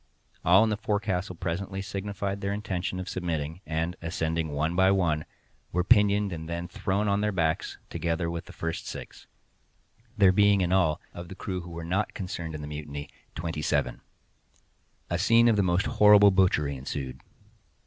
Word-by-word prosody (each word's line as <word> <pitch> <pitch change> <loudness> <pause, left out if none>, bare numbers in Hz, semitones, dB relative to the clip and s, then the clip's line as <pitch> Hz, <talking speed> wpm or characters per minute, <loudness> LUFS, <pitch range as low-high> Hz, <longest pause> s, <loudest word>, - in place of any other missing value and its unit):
All 95 +5 +6
in 110 - +1
the 105 - 0
forecastle 100 -3 -1
presently 95 +4 -3
signified 100 0 -4
their 100 0 -1
intention 95 -3 -3
of 90 - -5
submitting, 85 -2 -3
and, 80 +2 -1
ascending 80 -1 -1
one 80 +3 -1
by 95 +1 +5
one, 85 -6 +1 0.5
were 90 +1 +1
pinioned 100 +1 +4
and 80 0 -6
then 85 +1 -3
thrown 95 +3 -1
on 100 0 +2
their 105 0 +1
backs, 80 -4 -1
together 85 0 -1
with 85 0 -4
the - - -11
first 80 0 -4
six—there 115 -5 -3
being 100 0 +4
in 90 -1 0
all, 85 -5 +3
of 85 0 -8
the 95 - -9
crew 95 -1 -4
who 85 - -10
were 85 0 -6
not 95 +5 -1
concerned 85 -4 -5
in 75 - -6
the 75 - -6
mutiny, 75 -1 -6 0.3
twenty 80 -1 -3
seven. 75 -2 0 1.1
A 85 - 0
scene 115 +5 +5
of 115 - +4
the 100 - +3
most 90 0 +1
horrible 105 -1 +7
butchery 90 -7 +2
ensued. 65 0 -5
90 Hz, 170 wpm, -27 LUFS, 80-100 Hz, 1.1 s, horrible